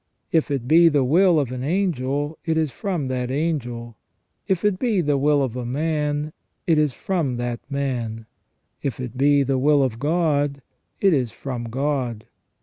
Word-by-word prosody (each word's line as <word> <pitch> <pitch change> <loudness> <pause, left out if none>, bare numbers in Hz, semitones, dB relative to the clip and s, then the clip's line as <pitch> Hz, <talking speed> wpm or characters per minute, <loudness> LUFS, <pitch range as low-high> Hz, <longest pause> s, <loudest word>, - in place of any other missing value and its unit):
If 160 -2 +2
it 135 -4 -2
be 165 +3 +6
the 145 -3 +2
will 170 +5 +4
of 135 -4 -1
an 130 -1 -4
angelj 145 -3 -1
it 160 -2 0
is 155 -3 +1
from 175 - -3
that 125 -1 -2
angel; 120 -6 -2 0.5
if 190 0 0
it 200 -3 +2
be 230 -6 +1
the 145 -4 +1
wiirof 140 -4 +2
a 125 - -3
man, 150 +3 -1 0.3
it 160 -3 +3
is 150 -2 +2
from 145 -3 -2
that 120 -1 -3
man; 120 -5 -3 0.6
if 135 -3 -3
it 125 -1 -5
be 140 +2 +4
the 135 -1 0
will 145 +1 +4
of 120 -4 -2
God, 145 -3 0 0.4
it 195 -3 +5
is 125 -6 0
from 125 -4 -5
God. 125 -2 -2
140 Hz, 170 wpm, -23 LUFS, 125-160 Hz, 0.6 s, be